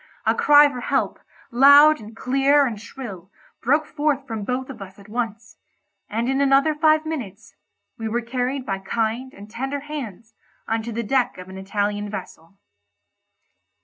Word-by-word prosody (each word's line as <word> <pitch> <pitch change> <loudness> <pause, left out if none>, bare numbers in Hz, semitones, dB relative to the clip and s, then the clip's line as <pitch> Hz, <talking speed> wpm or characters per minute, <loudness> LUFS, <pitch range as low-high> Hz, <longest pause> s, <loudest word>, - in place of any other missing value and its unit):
A - - +4
cry 295 0 +6
for 260 -3 -6
help—loud 285 +6 +4
and 220 +1 -12
clear 275 +2 +3
and 220 -5 -4
shrill—broke 240 - -4
forth 290 -3 -1
from 225 -5 -5
both 255 +4 -3
of 230 -5 -12
us 190 0 -10
at 200 0 -15
once; 225 -1 -5 0.5
and 230 +3 -1
in 270 +1 +1
another 275 +3 +4
five 310 0 +3
minutes 230 -8 -6 0.5
we 225 0 -3
were 240 +2 -1
carried 255 +2 -2
by 195 -1 -2
kind 225 +6 -2
and 205 -3 -12
tender 270 +6 -4
hands 230 -7 -7 0.3
on 225 0 0
to 235 +2 -6
the 230 +1 -3
deck 255 +3 0
of 180 0 -10
an 190 - -9
Italian 205 +1 -2
vessel. 195 -3 -9
240 Hz, 155 wpm, -22 LUFS, 210-275 Hz, 0.5 s, cry